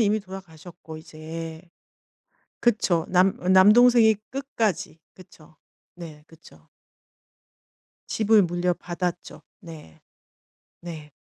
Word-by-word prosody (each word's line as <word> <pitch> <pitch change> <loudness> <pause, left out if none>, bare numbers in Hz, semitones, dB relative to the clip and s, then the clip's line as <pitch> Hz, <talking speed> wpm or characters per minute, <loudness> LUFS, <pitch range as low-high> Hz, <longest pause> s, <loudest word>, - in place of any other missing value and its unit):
이미 215 0 +2
돌아가셨고 175 -4 -12
이제. 160 +1 -9 1.0
그쵸. 195 -8 +1
남 185 +1 +3
남동생이 220 +5 +5
끝까지 230 - -3
그쵸. 160 -4 -19 0.4
네 160 -4 -11
그쵸. 150 - -19 1.4
집을 220 -1 +3
물려받았죠. 175 0 -3 0.2
네. 160 - -13 0.8
네. 160 -3 -9
175 Hz, 175 characters per minute, -24 LUFS, 160-205 Hz, 1.4 s, 남동생이